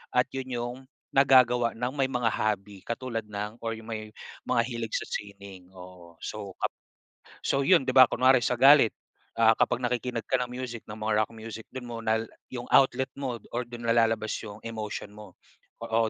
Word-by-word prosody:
at 125 0 +4
'yon 135 -1 -4
'yong 120 +1 -3 0.4
nagagawa 125 -3 +5
ng 125 +2 -2
may 135 -1 +2
mga 125 -2 0
hobby 100 -2 -2
katulad 115 -1 -3
ng 105 +1 -5
or 115 - -1
'yong 110 0 -12
may 110 -1 -5 0.4
mga 125 -2 +3
hilig 115 -3 -4
sa - - -1
sining, 100 -3 -8
oo. 90 -2 -13
So 105 -2 -6
kap - - 0 0.8
so 140 - +2
'yon, 170 -6 +5
'di 130 - +1
ba, 130 -1 +10
kunwari 130 0 +4
sa 125 - +1
galit, 135 -4 +7 0.5
ah, 115 -1 +6
kapag 125 +2 +1
nakikinig 120 -1 -2
ka 130 - +2
ng 125 - -3
music, 125 -2 -5
ng 105 - -7
mga 110 0 +1
rock - - -21
music, 110 0 -8
do'n 130 -1 -7
mo 120 - -5
nal 110 0 +1 0.3
'yong 120 -1 -5
outlet 130 0 +4
mo 130 -4 -3 0.2
or 120 - 0
do'n 120 0 -9
nalalabas 115 -2 +2
'yong 105 -2 -8
emotion 110 -2 -5
mo. 105 -3 -13 0.4
O 115 -1 +1
115 Hz, 185 wpm, -28 LUFS, 110-125 Hz, 0.8 s, ba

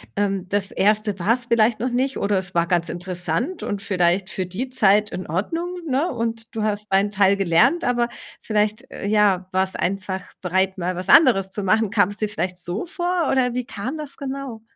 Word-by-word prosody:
Ähm, 195 -2 -1
das 200 -1 +1
1. 210 0 +1
war's 230 +7 0
vielleicht 225 -1 +3
noch 250 +3 -1
nicht 260 +2 -1
oder 200 0 +1
es 185 -1 -4
war 170 0 +2
ganz 175 -1 0
interessant 180 - -3
und 205 -1 -3
vielleicht 185 -1 +1
für 185 - -3
die 210 +9 -4
Zeit 210 -4 +3
in 185 - -5
Ordnung, 330 - -2 0.2
ne? 280 +6 +1
Und 230 -1 -4
du 220 - -2
hast 210 -1 -2
deinen 195 +2 +3
Teil 200 -1 +3
gelernt, 195 - +3
aber 240 -1 +1 0.3
vielleicht, 210 0 0
äh, - - -5
ja, 200 -3 +2
warst 190 0 -1
einfach 190 0 -2 0.2
bereit, 190 +1 0
mal 180 0 -2
was 180 0 -5
anderes 210 -11 +6
zu 205 +1 -4
machen. 215 +3 +2
Kam's 205 0 +1
dir 215 - -1
vielleicht 180 -1 -3
so 175 - -3
vor 350 -3 -1
oder 250 -2 +1
wie 250 -1 -2
kam 240 +8 -5
das 300 -2 -8
genau? 270 -4 -6
205 Hz, 195 wpm, -22 LUFS, 190-240 Hz, 0.3 s, anderes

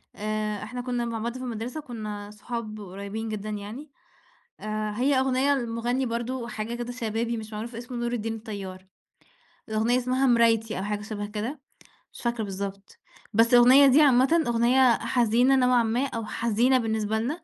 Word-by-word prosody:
آآ، 215 0 -3
إحنا 245 +3 -5
كنا 245 -1 -2
مع 230 -1 -3
بعض 235 +3 -3
في 255 - -7
المدرسة، 240 +4 -4
وكنا 210 -6 -7
صحاب 215 0 -6
قريبين 200 +3 -6
جدًا 215 0 -4
يعني، 215 +8 -7 0.7
آآ، 215 0 -3
هي 270 +3 +2
أغنية 265 +2 +2
لمُغنّي 240 +1 -1
برضه 235 +1 -3
حاجة 220 +2 -4
كده 240 0 -4
شبابي 230 0 -2
مش 220 0 -8
معروف 225 +3 -6
اسمه 245 +2 -7
نور 240 0 -2
الدين 225 -1 -2
الطيار، 195 -4 -7 0.8
الأغنية 225 +3 +2
اسمها 255 +2 +1
مرايتي 225 -2 +3
أو 190 - -3
حاجة 210 0 -2
شبه 210 -1 -5
كده، 225 +7 -4 0.5
مش - - -12
فاكرة 235 -2 -1
بالضبط، 195 0 -6 0.4
بس 230 +3 +4
الأغنية 255 +3 +8
دي 275 +4 +6
عامةً 275 +4 +5
أغنية 240 +1 +4
حزينة 245 +2 +3
نوعًا 250 -2 +4
ما 235 +5 0
أو 230 -3 -5
حزينة 235 +4 +2
بالنسبة 220 -2 -1
لنا، 305 +9 -3
230 Hz, 165 wpm, -26 LUFS, 215-250 Hz, 0.8 s, الأغنية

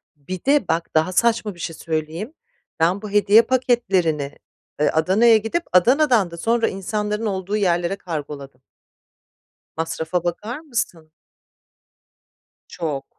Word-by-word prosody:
Bir 175 - -8
de 280 -7 +3
bak 165 +1 -1
daha 160 +4 +2
saçma 225 -2 +1
bir - - -17
şey 165 - -5
söyleyeyim, 160 - -4 0.5
ben 180 +5 +2
bu 210 - -6
hediye 205 +2 +6
paketlerini, 195 - 0 0.4
eee, 150 - +3
Adana'ya 205 +8 +4
gidip 225 +11 -2
Adana'dan 240 - +4
da 170 - -8
sonra 230 +5 +1
insanların 210 +3 -3
olduğu 195 0 -2
yerlere 175 -1 +1
kargoladım. 145 -7 -7 1.2
Masrafa 165 +1 -2
bakar 215 - -4
mısın? 180 - -4 1.6
Çok. 150 -5 -4
185 Hz, 120 wpm, -21 LUFS, 165-225 Hz, 1.6 s, hediye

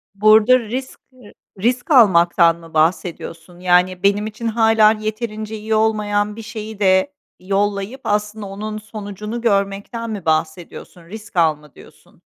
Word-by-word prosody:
Burada 215 +4 +5
risk 250 +4 -6
r 250 -5 -17 0.3
risk 245 +5 -1
almaktan 170 - +5
mı 165 -1 -15
bahsediyorsun? 165 +1 -2
Yani, 180 0 +2
benim 205 +2 +2
için 220 +2 -6
hâlâ 225 -1 +4
yeterince 215 0 -5
iyi 220 +1 -2
olmayan 210 -1 0
bir 225 - -8
şeyi 220 -1 -8
de 190 +8 +2 0.3
yollayıp, 200 +5 -2
aslında, 210 0 -2
onun 215 +2 -6
sonucunu 210 +1 -7
görmekten 205 +1 -1
mi 205 -5 -6
bahsediyorsun, 165 +2 -3
risk 210 +2 -11
al 160 -3 +3
mı 150 -2 -20
diyorsun? - - -19
210 Hz, 135 wpm, -19 LUFS, 185-220 Hz, 0.3 s, Burada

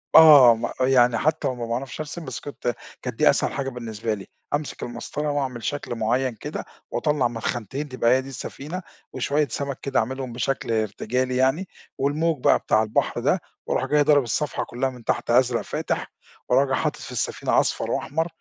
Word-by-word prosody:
آه، 145 -7 +10
م 115 +1 -3
يعني 125 -2 +4
حتى 155 +1 +1
لو 130 - -1
ما 120 -1 -4
باعرفش 125 +5 -4
أرسم 155 +2 -5
بس 130 -4 -5
كنت 125 -4 -4 0.3
كانت - - -5
دي - - +6
أسهل - - +2
حاجة 135 -1 -2
بالنسبة 115 -3 -4
لي، 100 -2 -7 0.3
أمسك 145 0 -2
المسطرة 145 +5 -3
وأعمل 130 -5 -2
شكل 145 -4 -3
معيَّن 120 +3 0
كده - - -6 0.3
واطلّع 145 0 +1
من 120 -1 -6
خانتين 130 +7 -3
تبقى 125 -2 +2
هي 130 +1 +4
دي 135 - -9
السفينة، 150 +7 -6 0.3
وشوية 145 +3 +1
سمك 140 -2 -4
كده 135 -1 +1
أعملهم 130 +1 -3
بشكل 125 0 -2
ارتجالي 115 +3 -1
يعني، 135 +9 +2 0.3
والموج 150 +1 0
بقى - - +5
بتاع 110 - +2
البحر 110 0 0
ده، - - +2 0.2
وارُوح - - 0
جاى 150 0 +3
ضارب 145 -2 +5
الصفحة 145 +5 -1
كلها 130 +3 -2
من 125 -2 -11
تحت 120 - -1
أزرق 125 -1 +3
فاتح، - - -3 0.4
وراجع 135 +1 +3
حاطط - - -1
في - - -8
السفينة - - +1
أصفر - - 0
وأحمر 160 +4 -1
130 Hz, 185 wpm, -24 LUFS, 120-145 Hz, 0.4 s, آه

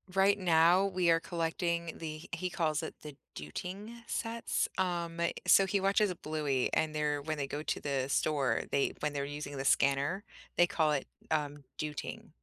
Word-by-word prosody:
Right 200 +1 +4
now, 175 +2 +5
we 185 -3 +1
are 165 0 +5
collecting 170 0 -1
the 155 -1 -6
he 180 +2 -2
calls 155 -3 0
it 160 - -6
the 150 -2 -9 0.2
"dooting" 180 - -6 0.2
sets, 230 0 -1
um, 170 -2 -1 0.3
so 195 - +7
he 195 0 0
watches 195 +2 +3
the 180 - -3
Bluey, 150 -5 -1
and 155 -1 +1
they're 150 -1 0
when 155 +1 -3
they 140 - -1
go 145 +2 -4
to - - -2
the 135 -2 0
store, 140 -1 +1
they 140 - +2
when 150 - 0
they're 140 -1 -2
using 145 -1 -6
the 135 - -3
scanner, 140 +10 +2 0.3
they 175 - +7
call 160 -5 +2
it, 140 - -1 0.2
um, 145 -2 -1
"dooting." 150 -1 -5
160 Hz, 180 wpm, -32 LUFS, 145-180 Hz, 0.3 s, so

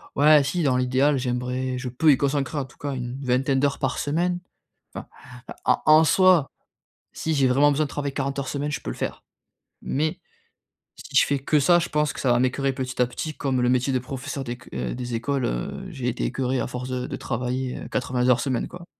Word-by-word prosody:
ouais, 150 0 +6
si, 170 +5 -1
dans 130 -4 +2
l'idéal 130 +3 +2
j'aimerais 125 0 -2
je 125 0 -4
peux 150 +6 +4
y 135 - +4
consacrer 140 +1 -1
en 140 - -1
tout 130 - -19
cas 145 -1 -4
une 125 +1 -5
vingtaine 135 +2 +1
d'heures 140 0 0
par 135 -1 -1
semaine. 175 +5 0 0.6
Enfin, - - -7 0.6
en 125 - +3
en 155 +1 +7
soi, 180 -3 +4 0.6
si 160 - -2
j'ai 140 -3 +3
vraiment 140 +3 +4
besoin 150 +2 +1
de - - -7
travailler 140 -1 -3
40 140 0 -2
heures 135 - -3
semaine 145 +1 -2
je - - -3
peux - - -4
le - - -8
faire. - - -4 0.6
Mais 155 +6 -2 0.7
si - - -11
je - - +6
fais 140 - 0
que 150 +3 +2
ça, 175 +5 +5
je 170 - -3
pense 150 -1 +1
que - - -8
ça 130 - +2
va 120 - +3
m'écœurer 135 +2 +1
petit 130 -1 -3
à 125 - +3
petit, 155 +5 -5
comme 130 -3 0
le 125 - +2
métier 125 +2 +1
de 130 - +2
professeur 135 +2 -5
d'éc 120 -1 -8
des 120 - -3
écoles, 130 +3 -1
heu, - - -3
j'ai 135 -8 -5
été 125 - -1
écœuré 130 -1 -1
à - - -1
force 125 +1 -6
de 125 -1 -2
de - - -4
travailler 125 +1 -3
80 125 0 0
heures 125 -1 +5
semaine, 130 -1 -1
quoi 180 -1 -11
135 Hz, 220 wpm, -24 LUFS, 125-145 Hz, 0.7 s, en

